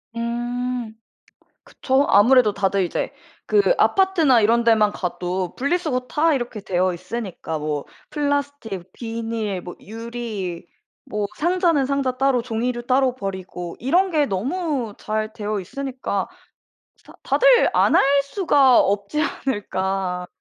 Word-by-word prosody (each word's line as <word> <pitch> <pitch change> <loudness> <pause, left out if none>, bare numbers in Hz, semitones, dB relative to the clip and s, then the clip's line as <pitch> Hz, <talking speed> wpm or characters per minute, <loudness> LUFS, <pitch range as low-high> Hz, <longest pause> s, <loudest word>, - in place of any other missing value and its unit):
음. 240 0 -3 0.7
그쵸. 270 +2 0
아무래도 225 +1 +5
다들 195 -1 +1
이제 - - -3 0.3
그 420 +4 +3
아파트나 335 -11 +4
이런 230 +2 +3
데만 220 -2 +4
가도 180 0 -3
분리수거 285 -1 0
다 315 0 +2
이렇게 240 -4 -4
되어 185 -1 0
있으니까 185 -3 -5
뭐 150 -1 -3 0.2
플라스틱, 285 - -3
비닐, 225 -4 -4
뭐 175 0 -9
유리 220 -6 -6 0.4
뭐 210 -1 -2
상자는 340 -4 +2
상자 275 -2 -1
따로 270 -2 +2
종이류 240 +1 -3
따로 255 -1 +2
버리고 190 -5 -6
이런 360 +9 +2
게 300 -4 +2
너무 255 - -2
잘 215 0 -3
되어 210 -2 -3
있으니까 255 -1 -4 0.7
스 - - -29
다 - - -15
'다들 - - +4
안 - - +4
할 - - +6 0.2
수가 280 - +4
없지 200 +10 0
않을까.' 190 -9 -2
235 Hz, 255 characters per minute, -22 LUFS, 200-275 Hz, 0.7 s, 할